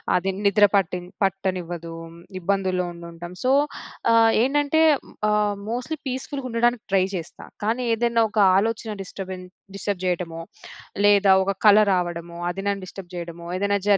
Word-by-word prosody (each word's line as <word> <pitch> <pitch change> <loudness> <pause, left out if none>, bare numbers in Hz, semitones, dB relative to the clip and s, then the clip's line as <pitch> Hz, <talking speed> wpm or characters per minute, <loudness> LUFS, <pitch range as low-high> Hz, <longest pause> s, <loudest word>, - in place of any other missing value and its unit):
అది 185 +2 +1 0.2
నిద్ర 205 +1 +6
పట్టి 180 -2 +1 0.2
పట్టనివ్వదు, 180 -3 -2 0.5
ఇబ్బందుల్లో 185 -1 0
ఉండుంటాం. 170 0 -9
సో 255 - +3 0.6
ఆహ్, 225 0 +6
ఏంటంటే 290 +4 +2 0.5
ఆహ్, 210 -1 +1 0.2
మోస్ట్‌లీ 250 +6 -3
పీస్‌ఫుల్‌గ 265 +1 -5
ఉండడానికి 240 0 +1
ట్రై 190 -1 +5
చేస్తా. 175 -1 -7 0.2
కానీ 230 +4 0
ఏదైనా 230 0 +2
ఒక 215 - -9 0.2
ఆలోచన 220 +2 -1
డిస్టర్బెన్ 185 -1 -7 0.3
డిస్టర్బ్ 200 -1 -3
చేయటమో, 175 -2 -2 0.6
లేదా 205 -1 +5
ఒక 195 - 0
కళ 210 -1 +8 0.2
రావడమో 170 -1 -3
అది 195 +2 -4
నన్ను 200 -1 -1
డిస్టర్బ్ 185 -1 -10
జేయడమో, 170 -1 -7
ఏదైనా 200 +1 +1
జరి 200 - +6
195 Hz, 135 wpm, -23 LUFS, 180-225 Hz, 0.6 s, కళ